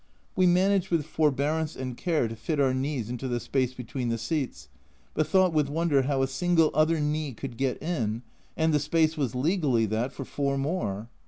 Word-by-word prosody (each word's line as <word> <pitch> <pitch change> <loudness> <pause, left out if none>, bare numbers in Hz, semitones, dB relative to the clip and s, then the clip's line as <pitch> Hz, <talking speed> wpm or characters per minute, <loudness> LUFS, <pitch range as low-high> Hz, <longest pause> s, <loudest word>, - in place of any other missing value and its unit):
We 185 -1 +4
managed 190 +1 +3
with 165 -4 +1
forbearance 155 +1 0
and 130 -2 -5
care 160 -4 0
to 115 - -6
fit 145 +7 -2
our 135 -2 +3
knees 130 -3 -2
into 125 +2 -4
the 120 -1 -1
space 130 0 -1
between 125 0 -4
the 115 - 0
seats, 115 - -3 0.5
but 155 - 0
thought 185 -3 +3
with 150 -3 +2
wonder 155 -2 +2
how 135 0 0
a - - +1
single 165 +4 +2
other 155 +2 +3
knee 150 -1 -1
could 120 +1 -7
get 130 0 -1
in, 120 -9 -2 0.3
and 160 0 +2
the 150 - +4
space 160 +2 +2
was 135 -6 -2
legally 135 - +2
that 110 +5 -1
for 135 - -7
four 140 0 -1
more 135 - -2
140 Hz, 195 wpm, -27 LUFS, 125-160 Hz, 0.5 s, We